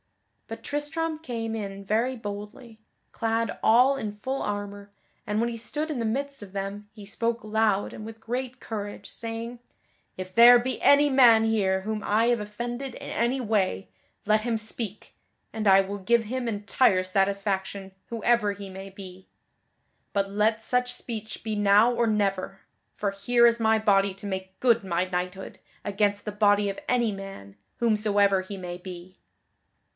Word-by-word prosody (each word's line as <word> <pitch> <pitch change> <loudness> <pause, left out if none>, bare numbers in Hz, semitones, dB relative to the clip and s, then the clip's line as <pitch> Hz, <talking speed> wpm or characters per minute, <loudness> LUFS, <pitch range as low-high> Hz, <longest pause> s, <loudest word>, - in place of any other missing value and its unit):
But - - -8
Tristram 310 +2 -3
came 230 -6 -4
in 200 -2 -6
very 235 +6 0
boldly, 215 +2 -8 0.3
clad 225 -1 -1
all 250 +5 +5
in 210 -6 -5
full 265 +6 -3
armor, 205 0 -4 0.4
and 210 +1 -1
when 235 - +1
he 235 - -4
stood 295 +7 -4
in 275 - -3
the 230 - -1
midst 275 +4 -2
of 195 - -12
them 200 +1 -5
he 215 -2 -12
spoke 230 +3 -2
loud 215 -2 +1
and 215 - -8
with 225 +1 -9
great 250 +3 -4
courage, 205 -2 -6
saying: 230 +1 -5 0.6
"If 185 0 -7
there 240 +3 +9
be 255 +2 -3
any 290 +1 +6
man 240 -5 +6
here 195 -4 +1
whom 215 +2 -3
I 215 +3 +2
have 240 0 +2
offended 240 +5 -5
in - - -8
any 240 +3 0
way, 210 -5 0 0.4
let 215 +1 +3
him 230 0 -1
speak, 215 -1 -6 0.4
and 215 -1 -2
I 195 0 +7
will 200 +1 -5
give 230 +4 +2
him 250 +2 -3
entire 205 -2 +2
satisfaction 195 0 -1
whoever 230 -2 +1
he 200 -1 -9
may 190 +1 -8
be. 190 -1 -12 0.8
But 195 -1 0
let 215 +2 +1
such 250 +1 0
speech 220 -3 -7
be 220 -1 -2
now 205 +3 +5
or 235 -1 +1
never, 195 -2 -1 0.3
for 200 -1 -1
here 235 +5 +3
is 235 0 +4
my 220 -1 +3
body 200 -2 +3
to 195 - -11
make 190 -1 -5
good 235 -4 +3
my 180 -1 0
knighthood 180 +1 -4 0.3
against 205 0 0
the 210 - -3
body 205 -1 +3
of 195 - -5
any 240 -3 +2
man, 195 - -9 0.2
whomsoever 205 -4 +2
he 195 +1 -8
may 175 -1 -6
be." 180 0 -10
215 Hz, 165 wpm, -26 LUFS, 195-235 Hz, 0.8 s, there